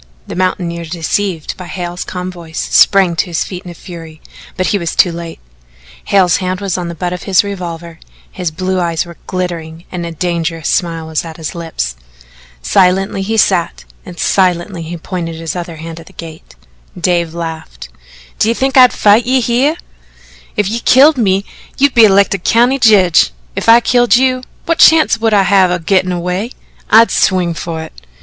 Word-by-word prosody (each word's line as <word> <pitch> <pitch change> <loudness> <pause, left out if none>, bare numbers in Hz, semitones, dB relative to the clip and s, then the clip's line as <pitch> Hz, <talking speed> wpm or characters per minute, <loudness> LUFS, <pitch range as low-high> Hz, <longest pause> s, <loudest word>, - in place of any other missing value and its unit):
The - - -7
mountaineer, 175 -2 -2
deceived 170 +1 -3
by 180 - -9
Hale's 175 -1 -5
calm 180 0 -6
voice, 170 -2 -8
sprang 190 -4 +4
to 160 - 0
his 170 -2 -1
feet 180 -2 -8
in - - -8
a 175 - -10
fury, 165 -3 -11 0.4
but 185 - 0
he 205 - 0
was 170 -2 -4
too 180 - +4
late. 170 -1 -7 0.7
Hale's 185 -4 +3
hand 185 -1 -3
was 195 -3 -2
on 180 -2 -3
the 170 - -6
butt 175 +2 -3
of 180 - -7
his 190 - +4
revolver, 170 -4 -7 0.3
his 180 -3 -3
blue 185 +3 -2
eyes 170 -1 -1
were 170 -1 -12
glittering 170 -2 -5
and 180 -2 -4
a 170 - -5
dangerous 165 -1 -3
smile 165 -2 -1
was 160 -1 -2
at 165 -2 -9
his 160 - -5
lips. 160 - -4 0.7
Silently 190 - +2
he 220 +3 -2
sat 185 -5 +1 0.2
and 180 -1 -11
silently 180 -1 0
he 165 +2 -6
pointed 165 -1 -5
his 165 +1 -5
other 175 -2 -6
hand 165 +1 -8
at 165 - -14
the - - -16
gate. 160 - -11 0.4
Dave 170 -1 0
laughed: 160 - -7 0.5
"D'ye 230 +2 +2
think 270 +2 0
I'd 250 -1 +7
fight 215 +3 +3
you 260 +1 +3
hyeh? 250 +6 +1 0.8
If 205 -2 +1
you 225 +4 -2
killed 275 +4 +5
me, 195 -2 +1 0.3
you'd 280 -1 +3
be 230 -2 +7
elected 200 -2 +2
County 245 +4 +3
Jedge; 195 - +4 0.3
if - - -1
I 230 +1 +8
killed 245 -3 +3
you, 255 0 +2 0.2
what 335 0 0
chance 315 -8 +5
would 225 -1 +2
I 200 - +4
have 190 -1 +3
o' 180 - 0
gittin' 185 +2 0
away? 180 +6 -3 0.4
I'd 230 +1 +6
swing 180 -3 +1
fer 165 -1 -5
it." 160 - -11
180 Hz, 185 wpm, -14 LUFS, 170-200 Hz, 0.8 s, I